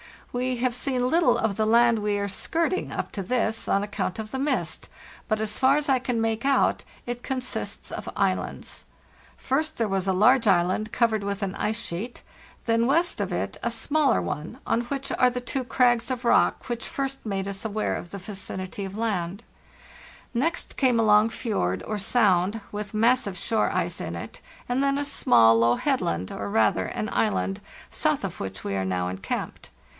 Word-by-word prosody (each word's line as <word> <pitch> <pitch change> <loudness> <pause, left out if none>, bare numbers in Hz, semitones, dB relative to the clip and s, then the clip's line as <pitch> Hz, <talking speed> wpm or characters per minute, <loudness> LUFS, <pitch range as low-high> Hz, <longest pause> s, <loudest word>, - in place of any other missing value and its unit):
We 250 +1 0
have 245 0 0
seen 250 0 0
little 340 +4 +4
of 210 -3 -1
the 215 - +2
land 235 +1 +5
we 205 -1 0
are 200 0 -2
skirting 335 - -1
up - - -4
to 200 - -4
this, 225 +2 0
on 200 - +2
account 205 -2 -3
of 220 -1 -6
the 265 - -3
mist; 285 +2 -1 0.4
but 215 -1 0
as 215 -1 -2
far 265 +1 +5
as 295 -1 0
I 265 -1 +4
can 245 -2 -1
make 225 0 0
out 275 -1 +2 0.2
it 245 0 -4
consists 255 0 -4
of - - -5
islands. - - -2 0.5
First 305 +4 -1
there 225 -3 0
was 195 -1 -1
a 190 - +3
large 225 +5 +4
island 185 +3 +2
covered 225 -3 +2
with 200 0 -3
an 195 -1 -2
ice 220 +1 -1
sheet; 225 +4 -5 0.4
then 230 0 +2
west 335 +6 +2
of - - -2
it - - -2
a 235 - 0
smaller 255 - +2
one, 150 - -5
on 230 - +1
which 270 +3 -4
are 250 - +6
the 250 0 -4
two 255 +1 -3
crags 245 -1 +2
of 255 -1 -3
rock 235 - +3
which 235 -1 -3
first 270 -1 -4
made 195 -2 -2
us 200 +2 -5
aware 215 0 -1
of 175 - -6
the 200 - -7
vicinity 190 0 -5
of 195 +2 -7
land; 200 -2 -2 0.9
next 285 +8 -1
came 255 -4 +3
a - - +4
long 210 +1 +5
fjord 95 - -2
or 215 - -3
sound, 200 -1 +2
with 205 0 -5
massive 225 -3 +2
shore 225 +4 +1
ice - - -1
in - - -4
it; - - -8 0.3
and 250 +2 +1
then 275 0 +2
a 285 - -1
small, 115 - +5
low 115 +1 +4
headland, 90 -4 -1
or 100 0 -4
rather 105 -3 +2
an - - -3
island, 95 0 0 0.3
south - - +1
of - - -4
which 95 -1 -5
we 100 - -3
are 95 -1 -1
now 90 -1 -1
encamped. 95 +1 -5
220 Hz, 190 wpm, -26 LUFS, 190-250 Hz, 0.9 s, are